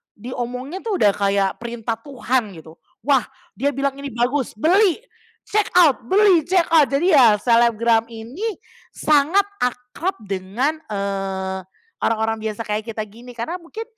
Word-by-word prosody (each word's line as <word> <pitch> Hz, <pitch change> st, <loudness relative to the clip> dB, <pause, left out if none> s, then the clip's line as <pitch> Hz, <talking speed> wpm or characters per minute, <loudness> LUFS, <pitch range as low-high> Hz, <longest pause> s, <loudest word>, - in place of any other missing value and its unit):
diomongin 250 Hz, -, -5 dB
tuh 425 Hz, -3 st, 0 dB
udah 205 Hz, -, +4 dB
kayak 195 Hz, -1 st, 0 dB
perintah 230 Hz, -1 st, -4 dB
Tuhan 250 Hz, -5 st, -2 dB
gitu, 160 Hz, 0 st, -13 dB, 0.3 s
wah 275 Hz, -3 st, +3 dB, 0.3 s
dia 285 Hz, +1 st, +1 dB
bilang 275 Hz, 0 st, 0 dB
ini 280 Hz, -, -5 dB
bagus, 250 Hz, +3 st, 0 dB
Beli! 375 Hz, -, +3 dB, 0.4 s
Check 425 Hz, -1 st, 0 dB
out! 325 Hz, -7 st, +6 dB
Beli! 380 Hz, -5 st, +4 dB
Check 360 Hz, -2 st, +3 dB
out! 310 Hz, -4 st, +6 dB
Jadi 320 Hz, +7 st, +1 dB
ya, 240 Hz, -8 st, +7 dB
selebgram 230 Hz, -1 st, +3 dB
ini 255 Hz, -, -5 dB, 0.4 s
sangat 310 Hz, +7 st, +3 dB, 0.2 s
akrab 250 Hz, +9 st, -2 dB
dengan, 205 Hz, +11 st, -2 dB
eee, 195 Hz, -2 st, -3 dB, 0.4 s
orang-orang 225 Hz, 0 st, +1 dB
biasa 220 Hz, 0 st, -3 dB
kaya 210 Hz, +1 st, -2 dB
kita 225 Hz, -1 st, -7 dB
gini. 235 Hz, +4 st, -13 dB
Karena 240 Hz, +10 st, -4 dB
mungkin, 425 Hz, +7 st, -8 dB
245 Hz, 140 wpm, -21 LUFS, 220-310 Hz, 0.4 s, ya